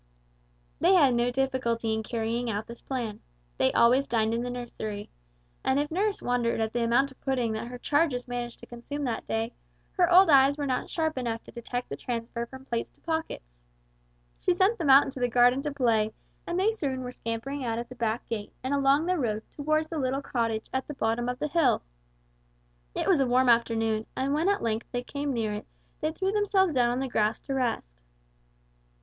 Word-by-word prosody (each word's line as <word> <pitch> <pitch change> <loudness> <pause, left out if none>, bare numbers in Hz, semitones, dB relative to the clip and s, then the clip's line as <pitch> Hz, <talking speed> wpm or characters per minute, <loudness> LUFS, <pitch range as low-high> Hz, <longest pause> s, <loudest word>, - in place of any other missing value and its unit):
They 370 +3 +5
had 280 -8 +5
no 240 +1 +2
difficulty 245 -3 0
in 220 - -1
carrying 230 +1 -2
out 210 0 -2
this 235 0 -11
plan. 235 -6 -4 0.4
They 130 - +4
always 255 +4 +4
dined 225 -1 +1
in 230 - 0
the 245 - -3
nursery, 220 -4 -6 0.5
and 265 +1 +2
if 295 +1 -2
nurse 395 +4 0
wondered 240 -2 0
at 220 0 -1
the 240 -1 0
amount 255 +4 +2
of 265 - -19
pudding 250 -4 0
that 220 +2 -4
her 245 0 -7
charges 285 -2 +1
managed 240 -1 -4
to - - -10
consume 265 +5 -6
that 240 -4 -3
day, 225 +1 -1 0.4
her 360 -2 +2
old 360 -1 +7
eyes 275 +1 +6
were 290 - -2
not 255 -2 -1
sharp 315 -4 -1
enough 230 -2 -3
to - - -13
detect 245 +1 -4
the 140 - -3
transfer 235 - -4
from 265 +2 -12
plates 235 -3 -2
to - - -34
pockets. - - -4 0.8
She 365 - +2
sent 380 +5 +2
them 315 -5 0
out 270 +1 +9
into 270 -1 -6
the 245 - +2
garden 245 +2 +4
to 295 +1 -3
play, 225 -6 +1 0.3
and 345 +1 -1
they 410 +4 +3
soon 275 -12 -3
were 250 -1 -5
scampering 250 +4 -4
out 230 -2 -1
of 235 0 -4
the - - -10
back 230 -1 -2
gate 210 -3 -4
and 260 +2 -1
along 280 +2 +3
the 365 -1 +1
road 220 -4 -1
toward 310 +2 0
the 315 0 -4
little 270 +1 -1
cottage 230 -4 -1
at 265 0 -1
the 295 - -6
bottom 235 +1 0
of 250 - -3
the 300 - -2
hill. 315 - +2 1.1
It - - -1
was 345 - +4
a 270 - +3
warm 250 +1 +3
afternoon, 225 -2 +2
and 270 +2 0
when 315 +4 +1
they 405 - +5
at 405 - -5
length 225 0 -2
came 285 +1 -3
near 225 -4 -1
it 210 - -6 0.3
they 310 0 0
threw 380 +4 -1
themselves 395 -4 +2
down 245 -3 +3
on 245 +1 -1
the 270 - -1
grass 215 -3 +1
to 275 - -4
rest. 225 - -2
250 Hz, 210 wpm, -28 LUFS, 230-285 Hz, 1.1 s, out